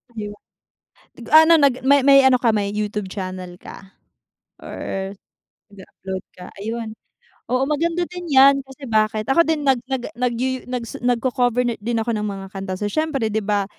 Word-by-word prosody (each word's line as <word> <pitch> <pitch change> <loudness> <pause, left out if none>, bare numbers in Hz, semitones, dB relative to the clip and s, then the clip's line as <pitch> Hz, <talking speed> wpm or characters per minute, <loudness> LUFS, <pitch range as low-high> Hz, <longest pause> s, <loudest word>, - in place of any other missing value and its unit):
'Di 210 -1 -4
ba? 205 - -14 0.8
Nag-aano 320 +2 +6
nag 280 -4 +4
may 280 0 +5
may 275 -1 +8
ano 255 -1 +5
ka 235 - +3
may 200 -1 0
YouTube 210 -2 -3
channel 185 -2 -6
ka 195 +1 -13 0.7
or 195 0 -5 0.6
nag-a-upload 190 -1 -8
ka? 180 - -10 0.2
Ayun, 225 0 -5 0.6
oo, 255 +1 +1
maganda 335 +4 0
din 355 -1 -7
yan, 275 +1 +6
kasi 270 +1 -13
bakit 215 0 +1
ako 335 +4 +4
din 315 -2 0
nag 270 -3 +3
nag 250 -2 -2
yuyu 260 +1 -3
nag 250 -1 -3
su - - -8
nag-ko-cover 245 0 +1
na 240 -1 0
din 230 +3 -3
ako 235 - -3
ng 210 0 -2
mga 195 -1 -5
kanta, 195 -1 -5
so 205 +2 -3
siyempre 280 -7 -1
di 220 - 0
ba 205 -1 0
235 Hz, 175 wpm, -21 LUFS, 205-270 Hz, 0.8 s, may